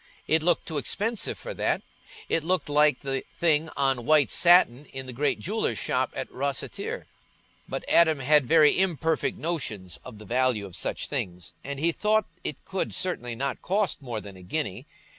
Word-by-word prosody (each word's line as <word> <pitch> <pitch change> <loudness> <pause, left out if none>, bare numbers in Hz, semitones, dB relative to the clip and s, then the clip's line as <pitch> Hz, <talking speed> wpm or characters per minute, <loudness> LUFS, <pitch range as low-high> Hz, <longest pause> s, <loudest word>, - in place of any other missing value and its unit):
It 160 0 +3
looked 175 +1 +1
too 155 -3 -1
expensive 220 - -1
for - - -6
that—it 165 - -3
looked 175 -3 0
like 150 -2 +3
the 135 -1 -3
things 160 -1 +2
on 135 -3 +1
white 150 +1 +4
satin 170 -7 +5
in 135 0 -6
the 130 - -7
great 145 +4 +1
jeweller's 215 +5 -1
shop - - 0
at - - -3
Rosseter. 450 +5 -3 0.6
But - - -4
Adam 160 -2 +5
had 140 0 +3
very 155 +2 +5
imperfect 165 -4 +1
notions 110 - -4
of 125 -4 -10
the 105 - -12
value 125 -1 +1
of 95 -3 -10
such - - -2
things, 90 -1 -4
and 140 0 -5
he 165 +3 +2
thought 215 +3 +1 0.2
it 145 - -5
could 190 0 -3
certainly 125 -10 0
not 135 +2 -3
cost 195 -3 0
more 120 -5 -4
than 100 -2 -11
a 95 - -13
guinea. 95 - -4
150 Hz, 175 wpm, -26 LUFS, 125-170 Hz, 0.6 s, satin